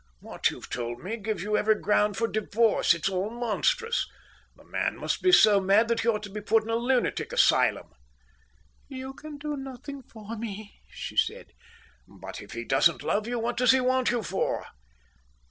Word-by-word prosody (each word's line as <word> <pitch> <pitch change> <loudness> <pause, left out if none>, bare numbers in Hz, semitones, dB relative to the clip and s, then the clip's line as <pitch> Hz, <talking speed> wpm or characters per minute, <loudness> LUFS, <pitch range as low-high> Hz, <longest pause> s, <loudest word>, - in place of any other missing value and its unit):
What - - -1
you've - - -9
told 120 +1 -5
me 205 +5 -3
gives 210 -4 -3
you 210 +1 0
every 215 +1 +3
ground 210 0 +2
for 230 - +1
divorce. 215 -3 +2
It's 170 - -2
all 190 +1 -1
monstrous. 450 - 0 0.5
The - - -19
man - - -2
must - - -2
be 370 - +4
so 215 - +7
mad 200 +4 +3
that 235 - +1
he 230 - -2
ought 215 -2 +1
to 205 - -8
be 210 +1 -5
put 220 +1 +2
in 225 - -5
a - - +1
lunatic 245 +2 0
asylum." - - +3 1.0
"You 265 -1 -7
can 305 +1 -10
do 295 +1 -4
nothing 270 +1 -8
for 225 -2 -9
me," 215 -2 -8
she - - -7
said. - - 0 0.6
"But - - -9
if - - -11
he 115 - -4
doesn't 135 +7 +2
love 210 +2 0
you, 240 0 -2
what 235 +1 -2
does 250 0 +5
he 265 - +4
want 255 0 +2
you 240 -2 0
for?" 190 0 -2
225 Hz, 190 wpm, -27 LUFS, 205-255 Hz, 1.0 s, so